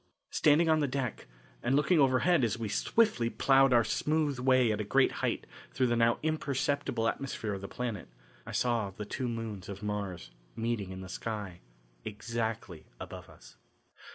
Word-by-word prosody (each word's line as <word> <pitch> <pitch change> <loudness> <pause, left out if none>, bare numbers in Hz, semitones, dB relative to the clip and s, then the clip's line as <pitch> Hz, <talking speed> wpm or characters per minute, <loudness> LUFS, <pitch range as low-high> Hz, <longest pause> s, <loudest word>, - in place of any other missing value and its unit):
Standing 155 +2 +4
on 160 -1 +4
the 145 - +1
deck, 130 -3 -3 0.3
and 130 - +1
looking 155 +4 +3
overhead 135 +4 +4
as 115 +1 +1
we 115 -2 -3
swiftly 120 - +2
ploughed 135 +2 +4
our 120 -1 +5
smooth 150 0 0
way 130 -2 +4
at 105 0 -1
a - - -1
great 100 - +3
height - - -1 0.3
through 130 - +2
the 120 -1 +2
now 115 0 +3
imperceptible 140 -5 0
atmosphere 115 -3 -3
of 95 - -5
the 100 - -6
planet, 115 -5 -4 0.4
I - - -8
saw 120 -5 0
the 105 +2 -7
two 125 +4 -3
moons 115 -5 -5
of 100 +1 -7
Mars 100 -10 -4 0.2
meeting 115 -4 -2
in 95 0 -7
the 95 - -8
sky 100 -2 -5 0.4
exactly 110 -4 -4
above - - -9
us. - - -16
115 Hz, 170 wpm, -31 LUFS, 105-135 Hz, 0.4 s, our